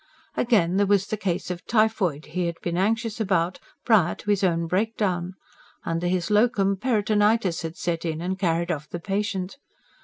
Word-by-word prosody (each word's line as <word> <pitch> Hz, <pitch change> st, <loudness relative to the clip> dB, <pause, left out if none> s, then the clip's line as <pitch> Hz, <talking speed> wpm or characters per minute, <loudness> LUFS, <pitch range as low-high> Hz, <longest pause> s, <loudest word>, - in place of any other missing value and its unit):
Again, 195 Hz, -7 st, +2 dB
there 200 Hz, 0 st, +3 dB
was 200 Hz, -1 st, +3 dB
the 215 Hz, -, -2 dB
case 185 Hz, -4 st, -2 dB
of 175 Hz, -1 st, -6 dB
typhoid 215 Hz, -9 st, +1 dB
he 180 Hz, -1 st, 0 dB
had 170 Hz, -1 st, -5 dB
been 170 Hz, -1 st, -2 dB
anxious 225 Hz, +4 st, 0 dB
about, 185 Hz, -3 st, 0 dB, 0.3 s
prior 205 Hz, -8 st, +4 dB
to 210 Hz, -, -3 dB
his 200 Hz, -1 st, +1 dB
own 170 Hz, -2 st, +2 dB
breakdown: 185 Hz, -1 st, -1 dB, 0.5 s
under 165 Hz, +1 st, -1 dB
his 180 Hz, +2 st, -1 dB
LOCUM, 205 Hz, -3 st, +3 dB
peritonitis 210 Hz, -4 st, +2 dB
had 165 Hz, 0 st, -6 dB
set 170 Hz, -2 st, -2 dB
in 160 Hz, -2 st, -2 dB
and 185 Hz, +3 st, -3 dB
carried 170 Hz, -1 st, +1 dB
off 150 Hz, -2 st, -4 dB
the 175 Hz, -, -5 dB
patient. 195 Hz, +2 st, -2 dB
185 Hz, 175 wpm, -25 LUFS, 170-210 Hz, 0.5 s, prior